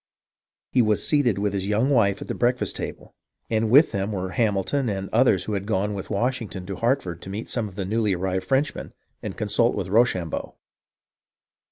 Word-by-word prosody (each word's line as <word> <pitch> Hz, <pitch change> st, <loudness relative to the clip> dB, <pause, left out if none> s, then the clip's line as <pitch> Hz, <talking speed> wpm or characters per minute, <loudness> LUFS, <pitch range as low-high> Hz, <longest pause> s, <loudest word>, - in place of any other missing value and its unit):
He 130 Hz, -, +4 dB
was 110 Hz, -2 st, +1 dB
seated 140 Hz, -9 st, +2 dB
with 100 Hz, 0 st, -1 dB
his 95 Hz, -1 st, -2 dB
young 110 Hz, +7 st, +1 dB
wife 100 Hz, -6 st, +2 dB
at -, -, -13 dB
the -, -, -2 dB
breakfast 125 Hz, +1 st, 0 dB
table, -, -, -6 dB, 0.4 s
and 110 Hz, 0 st, +1 dB
with 145 Hz, +7 st, +6 dB
them 100 Hz, +2 st, -2 dB
were 95 Hz, -2 st, -3 dB
Hamilton 115 Hz, +4 st, 0 dB
and 95 Hz, -1 st, -3 dB
others 110 Hz, -6 st, +4 dB
who 105 Hz, -, -4 dB
had 100 Hz, 0 st, -3 dB
gone 105 Hz, -1 st, 0 dB
with 100 Hz, -2 st, -6 dB
Washington 110 Hz, -4 st, -2 dB
to 95 Hz, +1 st, -5 dB
Hartford 115 Hz, -, -1 dB
to -, -, -9 dB
meet 105 Hz, +4 st, -5 dB
some 115 Hz, -3 st, -1 dB
of 95 Hz, -, -12 dB
the 95 Hz, -2 st, -3 dB
newly 105 Hz, -1 st, +1 dB
arrived 95 Hz, +1 st, -2 dB
Frenchmen, 135 Hz, +3 st, -1 dB, 0.3 s
and -, -, -6 dB
consult -, -, +1 dB
with -, -, -3 dB
Rochambeau. 95 Hz, -6 st, +1 dB
105 Hz, 190 wpm, -24 LUFS, 95-120 Hz, 0.4 s, with